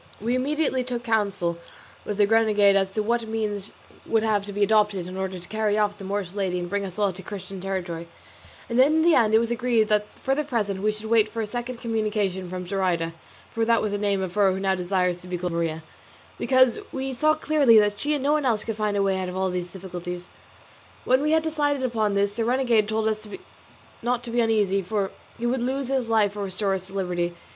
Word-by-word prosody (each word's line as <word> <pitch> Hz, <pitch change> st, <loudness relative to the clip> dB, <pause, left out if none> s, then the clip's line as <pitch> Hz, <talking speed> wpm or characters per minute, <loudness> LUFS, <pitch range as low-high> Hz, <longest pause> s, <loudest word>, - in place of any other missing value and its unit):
We 230 Hz, +4 st, -1 dB
immediately 265 Hz, 0 st, 0 dB
took 245 Hz, -1 st, -4 dB
counsel 200 Hz, -7 st, 0 dB, 0.5 s
with 210 Hz, -, -3 dB
the 205 Hz, -, +5 dB
renegade 210 Hz, -2 st, +4 dB
as 195 Hz, -1 st, +2 dB
to 215 Hz, -, 0 dB
what 235 Hz, +1 st, 0 dB
means 210 Hz, -2 st, -3 dB, 0.4 s
would 225 Hz, -1 st, +2 dB
have 210 Hz, -2 st, +1 dB
to 205 Hz, -, -6 dB
be 205 Hz, +1 st, 0 dB
adopted 205 Hz, -3 st, +2 dB
in 185 Hz, +1 st, -7 dB
order 190 Hz, 0 st, -3 dB
to 175 Hz, 0 st, -11 dB
carry 215 Hz, -1 st, 0 dB
off 205 Hz, 0 st, 0 dB
the -, -, -8 dB
Moorish 195 Hz, -2 st, -3 dB
lady 190 Hz, -3 st, -1 dB
and 175 Hz, 0 st, -3 dB
bring 200 Hz, +2 st, -2 dB
us 185 Hz, -1 st, -6 dB
all 200 Hz, -2 st, +1 dB
to 190 Hz, -, -9 dB
Christian 195 Hz, -1 st, -7 dB
territory; 175 Hz, -3 st, -4 dB, 0.6 s
and 235 Hz, +1 st, 0 dB
in 305 Hz, +4 st, +5 dB
the 340 Hz, 0 st, +5 dB
end 220 Hz, -5 st, +4 dB
it -, -, +8 dB
was 230 Hz, +1 st, 0 dB
agreed 235 Hz, -2 st, +1 dB
that 210 Hz, -1 st, +2 dB
for 270 Hz, -, 0 dB
the 300 Hz, +2 st, 0 dB
present 210 Hz, -8 st, -2 dB
we 215 Hz, +1 st, +2 dB
should 215 Hz, +1 st, -8 dB
wait 220 Hz, -1 st, +3 dB
for 230 Hz, -, -6 dB
a 220 Hz, -, 0 dB
second 240 Hz, +2 st, -5 dB
communication 210 Hz, -5 st, -1 dB
from 180 Hz, 0 st, -5 dB
Zoraida 175 Hz, -3 st, -1 dB, 0.4 s
(for 230 Hz, -, -1 dB
that 230 Hz, 0 st, +3 dB
was 210 Hz, -, -1 dB
the 205 Hz, -, -2 dB
name 200 Hz, -2 st, 0 dB
of 180 Hz, -2 st, -4 dB
her 200 Hz, -2 st, +4 dB
who 190 Hz, -, -2 dB
now 195 Hz, 0 st, +1 dB
desires 180 Hz, -1 st, 0 dB
to 180 Hz, -, -10 dB
be 180 Hz, 0 st, -3 dB
called 175 Hz, 0 st, -3 dB
Maria), 165 Hz, -1 st, -2 dB, 0.6 s
because 260 Hz, -, +4 dB
we 265 Hz, 0 st, -3 dB
saw 310 Hz, +5 st, +3 dB
clearly 295 Hz, -7 st, +4 dB
that 205 Hz, -1 st, +3 dB
she 300 Hz, +1 st, +1 dB
and 280 Hz, -, -3 dB
no 285 Hz, -, +2 dB
one 305 Hz, -1 st, +1 dB
else 230 Hz, -5 st, +1 dB
could 225 Hz, -2 st, -4 dB
find 210 Hz, -1 st, 0 dB
a 200 Hz, -, +2 dB
way 190 Hz, -1 st, +1 dB
out 185 Hz, -1 st, -3 dB
of 180 Hz, -, -5 dB
all 190 Hz, -1 st, 0 dB
these 180 Hz, -1 st, -4 dB
difficulties. 180 Hz, -1 st, -7 dB, 0.8 s
When 260 Hz, +2 st, +3 dB
we 300 Hz, -, +1 dB
had 320 Hz, 0 st, +3 dB
decided 290 Hz, -3 st, 0 dB
upon 220 Hz, -5 st, 0 dB
this 200 Hz, 0 st, +1 dB
the 230 Hz, -, 0 dB
renegade 235 Hz, -3 st, +2 dB
told 220 Hz, 0 st, 0 dB
us 215 Hz, 0 st, -2 dB, 0.7 s
not 245 Hz, 0 st, -1 dB
to 240 Hz, -, -6 dB
be 240 Hz, -, 0 dB
uneasy, 210 Hz, -4 st, +2 dB
for 195 Hz, +1 st, -2 dB, 0.3 s
he 235 Hz, -, -4 dB
would 245 Hz, +1 st, 0 dB
lose 265 Hz, +1 st, -1 dB
his 260 Hz, -4 st, 0 dB
life 210 Hz, -3 st, +2 dB
or 205 Hz, -1 st, -3 dB
restore 195 Hz, +1 st, -1 dB
us 185 Hz, -1 st, -4 dB
to 195 Hz, -, -12 dB
liberty. 175 Hz, -2 st, -1 dB
210 Hz, 235 wpm, -25 LUFS, 190-235 Hz, 0.8 s, it